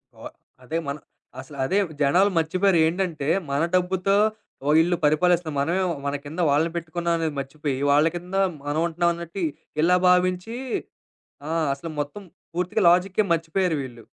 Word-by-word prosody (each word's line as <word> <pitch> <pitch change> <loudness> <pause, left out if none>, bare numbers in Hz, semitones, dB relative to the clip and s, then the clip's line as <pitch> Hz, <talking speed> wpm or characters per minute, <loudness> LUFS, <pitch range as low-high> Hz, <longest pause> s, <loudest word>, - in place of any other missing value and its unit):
ఓ - - -19 0.4
అదే 155 +6 -3
మన 140 +1 -3 0.4
అసలు 140 +2 -10
అదే. 190 +9 0 0.2
జనాలు 180 +8 +4
మర్చిపోయారు. 185 +3 +2
ఏంటంటే, 165 -5 -2 0.2
మన 140 +2 +1
డబ్బుతో 185 +2 +1 0.5
ఓ - - +2
ఈల్లు 175 +1 +1
పరిపాలిస్తున్న 165 +2 +2
మనమేమో 175 +5 0
మన 140 - -1
కింద 155 +5 -7
వాళ్ళని 155 +4 +2
పెట్టుకున్నాం 170 +1 -2
అనేది 160 -2 -2
మర్చిపోయి, 140 +1 -3 0.2
వాళ్ళ 150 +2 +5
కింద 180 +2 -6 0.3
మనం 145 +2 -1
ఉంటున్నాం 170 +1 +1
అన్నట్టు 170 +2 -7
ఇ - - +2 0.3
ఇలా 180 +2 +4
భావించి 180 +4 +2 0.9
ఆ! - - -4 0.2
అసలు 165 +4 -8
మొత్తం 145 +8 -5 0.3
పూర్తిగా 180 +4 -1
లాజికే 185 +4 +3
మర్చిపోయారు 165 +1 0
వీళ్ళు. 120 -3 -10
170 Hz, 150 wpm, -24 LUFS, 150-180 Hz, 0.9 s, వాళ్ళ